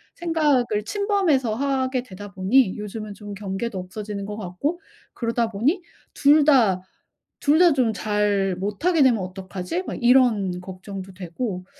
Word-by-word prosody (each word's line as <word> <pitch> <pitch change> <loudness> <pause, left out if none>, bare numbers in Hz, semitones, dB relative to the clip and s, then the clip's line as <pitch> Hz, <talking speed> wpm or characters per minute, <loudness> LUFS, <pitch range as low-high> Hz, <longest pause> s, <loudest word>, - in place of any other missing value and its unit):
생각을 290 -10 +1
침범해서 370 - +1
하게 260 -1 -1
되다 205 -2 -10
보니 195 +3 +2
요즘은 210 0 -6
좀 205 0 -9
경계도 200 +2 -4
없어지는 200 +2 -6
것 205 +1 -5
같고 215 - -3 0.3
그러다 230 -1 -1
보니 270 - 0 0.3
2 295 +1 +5
다 225 -11 +4 0.6
2 295 +3 +3
다 350 -2 +7
좀 245 -5 +1
잘 205 -3 0
못하게 275 - +1
되면 235 -6 +3
어떡하지?' 185 - -5
막 - - -5
이런 235 -8 +3
걱정도 190 +1 -8
되고 185 +1 -5
215 Hz, 270 characters per minute, -23 LUFS, 195-270 Hz, 0.6 s, 다